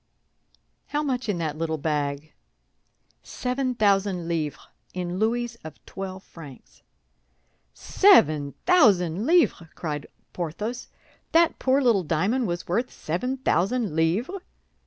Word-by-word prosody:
"How 295 +1 -1
much 255 -5 -2
in 200 - 0
that 155 -2 -3
little 160 -1 -1
bag?" 145 0 -2 0.9
"Seven 255 0 -3
thousand 195 -5 +1
livres, 160 -4 -3 0.3
in 180 0 -3
louis 235 +2 -1
of 160 -1 -9
twelve 190 0 -7
francs." 145 -6 -14 0.9
"Seven 155 - +4
thousand 205 - +4
livres!" 325 - +3
cried 150 -3 -4 0.3
Porthos. 195 +8 -4 0.5
"That 335 0 +4
poor 270 +1 +2
little 230 -6 +4
diamond 190 - 0
was 175 0 -4
worth 230 +8 -1
seven 250 +12 -3
thousand 215 -3 0
livres?" 200 - 0
190 Hz, 115 wpm, -25 LUFS, 160-250 Hz, 0.9 s, Seven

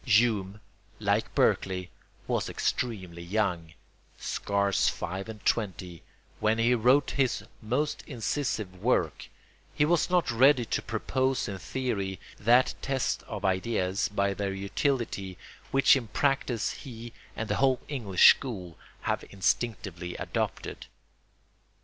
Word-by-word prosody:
Hume, 105 -4 +2 0.4
like - - 0
Berkeley, 90 -1 +1 0.3
was - - -1
extremely 95 -8 -2
young, 85 -3 -1 0.4
scarce 100 -1 +1
five 95 +4 -5
and 110 -2 -9
twenty, 95 -6 -1 0.4
when 110 +1 +2
he 115 +2 +3
wrote 125 +4 +4
his 130 -4 0 0.2
most 125 +8 -1
incisive 110 - -3
work; 95 -9 +1 0.5
he 150 - +3
was 170 +2 +2
not 180 -8 +2
ready 130 +1 +5
to - - -1
propose 130 -1 -1
in 100 -2 -5
theory 100 -7 -3 0.2
that 120 +4 +4
test 135 -1 -1
of 105 -3 -5
ideas 95 0 0
by 100 -1 0
their 100 0 -2
utility 100 -2 -2 0.3
which 135 0 +6
in 125 -4 -2
practice 130 -3 0
he 120 -3 -9 0.2
and 110 - -3
the - - 0
whole 135 -2 +3
English 110 -11 +6
school 95 -11 -7 0.2
have - - -1
instinctively 95 -3 -1
adopted. - - -3
110 Hz, 120 wpm, -28 LUFS, 95-125 Hz, 0.5 s, which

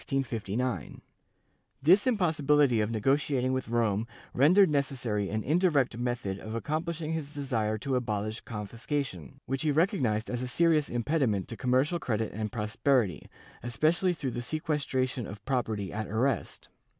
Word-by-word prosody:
* 135 -2 -1 1.5
This 190 - +5
impossibility 150 - +3
of 105 - 0
negotiating 130 +3 +1
with 130 0 -2
Rome 115 -2 +1 0.3
rendered 180 +9 +6
necessary 125 -8 -1
an 110 +1 -2
indirect 150 -5 +2
method 120 -5 -2
of 110 +2 -6
accomplishing 160 +5 -2
his 150 -3 -4
desire 115 -7 -1
to 135 +4 -2
abolish 110 -2 -2
confis 110 +1 -8
cation, 135 - -3
which 135 +1 -2
he 155 - +1
recognized 140 - +1
as 120 -1 -3
a 125 - -3
serious 155 +2 +2
impediment 120 - 0
to 115 - -5
commercial 130 - +1
credit 110 -6 -2
and 105 +1 -3
prosperity, 110 - 0 0.3
especially 155 - +1
through 140 -6 -3
the 120 - -4
sequestration 130 -4 -1
of 100 +1 -10
property 110 -7 -1
at 110 -1 -3
arrest. 115 +1 -1
125 Hz, 140 wpm, -29 LUFS, 110-150 Hz, 1.5 s, rendered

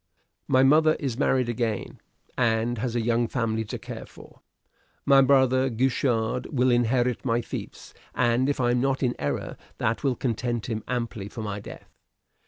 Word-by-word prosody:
"My 130 0 +4
mother 155 +3 +5
is 130 -4 -4
married 130 -4 +2
again, 115 -3 -3 0.4
and 115 -1 +1
has 120 +1 -2
a 120 - +1
young 120 +1 +1
family 115 -2 -1
to - - -5
care - - -8
for. - - -16 0.6
My 135 -1 +6
brother 130 -1 +3
Guichard 125 -1 0
will 130 -3 +2
inherit 120 0 +1
my 120 -1 +1
fiefs; - - -8 0.2
and 125 +2 +2
if 145 - -1
I 120 -1 +2
am 120 0 +1
not 135 +1 0
in 125 -1 +2
error, 70 - -3 0.2
that 110 +4 -1
will 135 -3 +1
content 120 -2 -2
him 110 -4 -4
amply 115 -5 -3
for 110 - -7
my 105 -1 -4
death. - - -12
120 Hz, 170 wpm, -26 LUFS, 115-130 Hz, 0.6 s, My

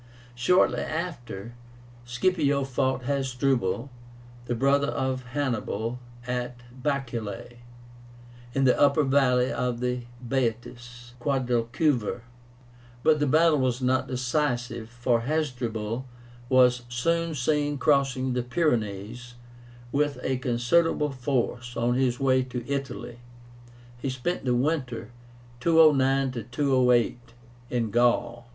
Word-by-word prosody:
Shortly 125 +10 +3
after, 120 - -5 0.5
Scipio 140 +2 +1
fought 130 -1 -1
Hasdrubal, 130 -4 0 0.5
the 120 - -2
brother 140 +3 +2
of 130 -2 -2
Hannibal, 125 -3 -2 0.3
at 125 0 -4 0.2
BAECULAE, 120 -5 -3 1.0
in 135 - +2
the 125 -1 +4
upper 145 +1 +5
valley 130 -2 +3
of 125 -1 -2
the 125 0 -1 0.3
Baetis 120 -1 -3
(Guadalquivir); 125 -2 0 0.8
but 155 -1 +4
the 145 - +1
battle 155 +2 +4
was 130 -1 0
not 130 0 +1
decisive, 125 -3 -1
for 120 0 0
Hasdrubal 125 -4 -2 0.4
was 125 -1 +5
soon 165 +7 0
seen 145 +2 0
crossing 135 -2 +2
the 125 - 0
Pyrenees, 120 - -2 0.6
with 145 0 +1
a 130 0 0
considerable 135 +5 +1
force, 125 -2 -2
on 120 +1 +1
his 125 -1 +1
way 130 -1 +3
to 125 -2 -6
Italy. 135 -3 -4 0.8
He 135 - -2
spent 130 +6 -3
the 125 -1 +2
winter 130 -3 -1 0.5
(209 135 -6 +3
208) 125 -3 +2 0.5
in 115 -3 -1
Gaul. 120 0 +1
125 Hz, 105 wpm, -26 LUFS, 120-140 Hz, 1.0 s, upper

